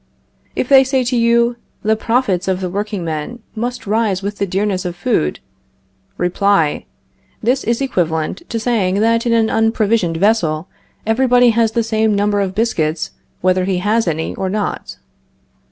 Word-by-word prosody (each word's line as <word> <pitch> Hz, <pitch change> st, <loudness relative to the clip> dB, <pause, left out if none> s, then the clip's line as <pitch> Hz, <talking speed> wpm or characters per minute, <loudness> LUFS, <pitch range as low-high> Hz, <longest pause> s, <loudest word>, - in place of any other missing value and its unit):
If -, -, -1 dB
they 270 Hz, -1 st, +7 dB
say 265 Hz, -1 st, 0 dB
to 250 Hz, +1 st, -1 dB
you: 235 Hz, 0 st, +3 dB, 0.3 s
The 220 Hz, +1 st, +2 dB
profits 220 Hz, -5 st, 0 dB
of 185 Hz, -1 st, 0 dB
the 185 Hz, -2 st, -3 dB
workingmen 195 Hz, -2 st, -3 dB, 0.2 s
must 240 Hz, +2 st, -4 dB
rise 205 Hz, -2 st, 0 dB
with 200 Hz, +1 st, -4 dB
the 200 Hz, -, 0 dB
dearness 190 Hz, 0 st, -1 dB
of 175 Hz, -1 st, -4 dB
food 75 Hz, -, 0 dB, 0.8 s
Reply: 180 Hz, -, +1 dB, 0.6 s
This 250 Hz, +4 st, +1 dB
is 235 Hz, +3 st, 0 dB
equivalent 165 Hz, -, -1 dB
to 230 Hz, -, -2 dB
saying 215 Hz, -5 st, 0 dB
that 230 Hz, +1 st, +2 dB
in 235 Hz, -, +2 dB
an 225 Hz, -1 st, +2 dB
unprovisioned 225 Hz, -6 st, +1 dB
vessel 175 Hz, -5 st, +1 dB, 0.4 s
everybody 245 Hz, +1 st, +4 dB
has 225 Hz, -1 st, +1 dB
the 230 Hz, -, +1 dB
same 220 Hz, -1 st, +1 dB
number 205 Hz, 0 st, +1 dB
of 190 Hz, -1 st, -2 dB
biscuits 165 Hz, -9 st, -1 dB, 0.3 s
whether 185 Hz, 0 st, +2 dB
he 190 Hz, -1 st, 0 dB
has 210 Hz, +3 st, +1 dB
any 160 Hz, -1 st, -2 dB
or 190 Hz, -, -3 dB
not. 205 Hz, +1 st, -3 dB
210 Hz, 155 wpm, -17 LUFS, 185-230 Hz, 0.8 s, they